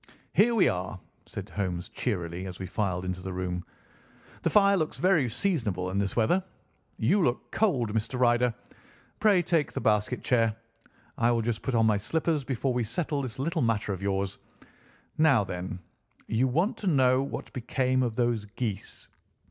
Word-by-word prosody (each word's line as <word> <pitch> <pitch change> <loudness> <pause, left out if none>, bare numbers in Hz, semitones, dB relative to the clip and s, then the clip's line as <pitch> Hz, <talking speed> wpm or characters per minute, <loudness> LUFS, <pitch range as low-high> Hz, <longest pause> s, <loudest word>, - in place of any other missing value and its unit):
"Here 230 +3 +4
we 205 - +5
are!" 90 +1 -2 0.3
said - - -7
Holmes 90 -3 -2
cheerily 90 -5 -3
as 90 -1 -7
we 95 - -5
filed 95 -1 -2
into 90 0 -3
the 95 +1 -5
room. 90 -1 -3 0.8
"The - - +1
fire 200 -1 +5
looks 155 -5 -1
very 170 -9 +3
seasonable 110 - -1
in 100 - 0
this 100 -1 -1
weather. 175 +12 +2 0.5
You 205 - +3
look 125 -6 0
cold, 130 - +1
Mr. 115 +3 -2
Ryder. 120 0 +4 0.7
Pray 200 -5 +4
take 165 -3 +1
the - - -2
basket 105 +3 +1
chair. 115 -3 +2 0.6
I 120 0 +4
will 115 -1 +2
just 115 -1 -2
put 130 - -2
on 115 -1 +4
my 110 -2 +3
slippers 155 +7 0
before 130 0 -1
we 120 -1 0
settle 145 +5 -2
this 130 -1 -5
little 150 +6 -1
matter 110 -4 0
of 95 - -6
yours. 100 -1 -1 0.8
Now, 140 -9 +5
then! 90 +1 -5 0.5
You 115 +4 +1
want 170 - +1
to 205 - -4
know 130 -5 +4
what 135 - -5
became 130 +1 0
of 120 -3 -1
those 120 -3 0
geese?" 105 -2 -5
120 Hz, 170 wpm, -28 LUFS, 100-140 Hz, 0.8 s, we